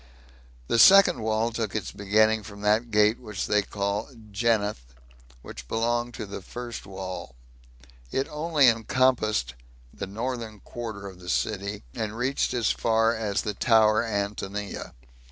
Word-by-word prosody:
The 115 - +2
second 190 - +8
wall 110 +1 0
took 110 -3 -3
its 110 - -3
beginning 110 +2 +2
from 100 0 -11
that 105 +3 +2
gate 105 +1 +3
which 105 -5 -5
they 105 0 +2
called 105 +3 -4
"Gennath," 105 - 0 0.5
which - - -10
belonged 120 - -1
to 110 - -5
the 100 0 -7
first 120 +4 -7
wall; 95 -8 -7 0.8
it 135 - -1
only 150 -2 +3
encompassed 115 - +2 0.4
the 100 - -6
northern 115 +1 -5
quarter 110 -5 -7
of 95 -2 -9
the 90 -1 -9
city, 100 +3 -2
and 110 +4 -4
reached 130 +3 0
as 120 -3 +2
far 115 0 +2
as 105 -3 -1
the 105 - -2
tower 110 0 +4
Antonia. 100 -2 -4
110 Hz, 140 wpm, -26 LUFS, 100-115 Hz, 0.8 s, second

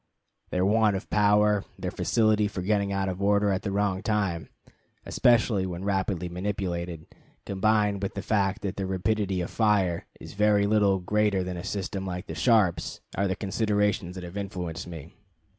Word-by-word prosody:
Their 90 +1 +1
want 105 0 +3
of 95 - -6
power, 105 0 +3
their - - -4
facility 110 -2 +2
for 95 -3 -5
getting 100 0 +1
out 100 0 -1
of 95 +1 -4
order 100 0 +3
at 95 - 0
the 100 - -3
wrong 100 -1 0
time, 100 -8 -1 0.6
especially 115 -5 +3
when 90 0 -5
rapidly 95 -3 -1
manipulated, 90 -3 -3 0.4
combined 105 0 +1
with 100 - -3
the 100 - -4
fact 100 -2 0
that 95 -2 -3
their 95 -1 -2
rapidity 95 0 0
of 85 - -5
fire 100 -6 +1
is - - -10
very 105 0 +3
little 100 -2 +3
greater 100 +1 +1
than 90 0 -4
a 85 - -6
system 95 -1 -3
like 90 -1 -5
the - - -7
Sharps, 110 -8 +2 0.2
are 100 - +1
the 95 - -1
considerations 105 -3 0
that 95 - -7
have 90 +3 -7
influenced 90 -5 -5
me. 80 -2 -9
100 Hz, 175 wpm, -27 LUFS, 90-105 Hz, 0.6 s, want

